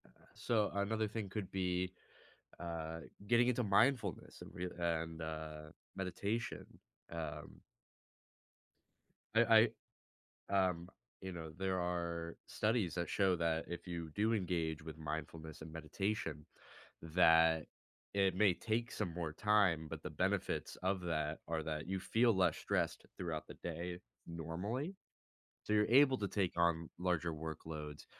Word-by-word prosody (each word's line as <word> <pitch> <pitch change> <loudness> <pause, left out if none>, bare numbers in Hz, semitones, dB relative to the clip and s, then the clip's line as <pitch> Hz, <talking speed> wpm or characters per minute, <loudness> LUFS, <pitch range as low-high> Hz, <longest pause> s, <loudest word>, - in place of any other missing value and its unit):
Uh, - - -20 0.2
so 110 -3 +1
another 110 +2 +1
thing 105 -2 -4
could 100 -1 -4
be, 90 -1 0 0.7
uh, 80 -1 -4 0.3
getting 120 +1 +5
into 125 0 +2
mindfulness 105 - +2
and - - -9
re 90 +1 -3
and, 80 -1 -1
uh, 80 -1 -5 0.3
meditation, 100 +5 -2 0.5
um 80 -3 -5 1.8
I 115 0 +7 0.8
I 95 -1 +4
um, 85 0 -5 0.3
you 95 - -5
know, 80 -3 -6
there 95 -1 0
are 85 -1 -2
studies 105 -6 +1
that 85 -3 -1
show 95 -2 +3
that, 80 -1 +1
if 85 +1 -6
you 85 -2 -4
do 110 +2 +3
engage 85 -6 0
with 80 0 -7
mindfulness 80 0 -5
and 80 0 -8
meditation, 80 -1 -2 0.6
that 80 -1 +5 0.5
it 100 -2 +3
may 100 -1 +5
take 115 +5 -1
some 95 -6 -2
more 80 -3 -3
time, 95 -6 +3
but - - -6
the - - -3
benefits - - 0
of 95 0 +1
that, 75 -3 -1
are 80 -1 -1
that, 75 0 -3
you 95 0 -1
feel 115 +4 +3
less 95 -1 +3
stressed - - -1
throughout 80 -4 -3
the - - -9
day, 85 +1 -4 0.3
normally. 90 - -3 0.7
So 105 - -1
you're 105 0 +5
able 135 +2 +7
to 100 - 0
take 95 -4 0
on 85 -1 +2
larger 90 -2 +1
workloads. 75 -1 -6
90 Hz, 140 wpm, -37 LUFS, 80-100 Hz, 1.8 s, I